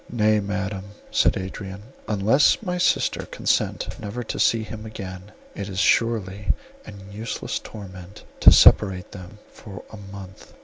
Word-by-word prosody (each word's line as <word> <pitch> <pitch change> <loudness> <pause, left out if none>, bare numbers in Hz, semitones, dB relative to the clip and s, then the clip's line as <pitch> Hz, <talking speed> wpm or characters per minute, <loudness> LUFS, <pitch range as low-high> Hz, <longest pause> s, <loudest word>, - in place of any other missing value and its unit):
"Nay, 110 -2 +3
Madam," 100 0 -4 0.2
said - - +3
Adrian, 95 +1 -7 0.2
"unless 110 - +3
my 180 -2 -2
sister - - +1
consent - - 0
never 110 +4 -5
to - - -5
see 115 -1 +3
him 110 0 -8
again, 95 -2 -8 0.2
it 100 0 -6
is 95 - -7
surely 105 -1 +1 0.3
an 100 0 -11
useless 110 +3 -4
torment 95 -2 -11 0.2
to - - +9
separate 95 -3 +5
them 100 +2 -11
for 100 -3 -11
a 110 - -9
month." 100 -2 -11
100 Hz, 140 wpm, -23 LUFS, 95-110 Hz, 0.3 s, to